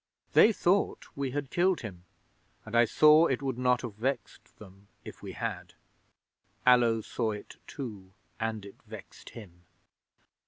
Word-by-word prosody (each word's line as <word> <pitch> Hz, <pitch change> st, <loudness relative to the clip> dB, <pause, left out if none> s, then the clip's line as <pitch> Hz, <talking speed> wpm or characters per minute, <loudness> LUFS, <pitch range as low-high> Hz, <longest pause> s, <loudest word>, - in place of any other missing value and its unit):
They 225 Hz, -, +7 dB
thought 195 Hz, -1 st, +1 dB
we 140 Hz, -1 st, -2 dB
had 140 Hz, +1 st, -4 dB
killed 180 Hz, +1 st, +2 dB
him, 90 Hz, -6 st, -9 dB, 0.6 s
and 110 Hz, +1 st, -6 dB
I 120 Hz, 0 st, +6 dB
saw 155 Hz, +6 st, +6 dB
it 130 Hz, +1 st, -2 dB
would 130 Hz, -3 st, -3 dB
not 125 Hz, -1 st, +2 dB
have 120 Hz, -4 st, -5 dB
vexed 120 Hz, +1 st, -4 dB
them 100 Hz, -1 st, -15 dB, 0.2 s
if -, -, -10 dB
we -, -, -7 dB
had. -, -, -5 dB, 0.9 s
Allo 120 Hz, -3 st, +5 dB
saw 110 Hz, 0 st, -2 dB
it 105 Hz, -, -10 dB
too, 105 Hz, -9 st, -8 dB, 0.3 s
and 110 Hz, -2 st, -3 dB
it 100 Hz, -, -14 dB
vexed -, -, -11 dB
him. 90 Hz, -6 st, -12 dB
120 Hz, 150 wpm, -29 LUFS, 105-140 Hz, 0.9 s, They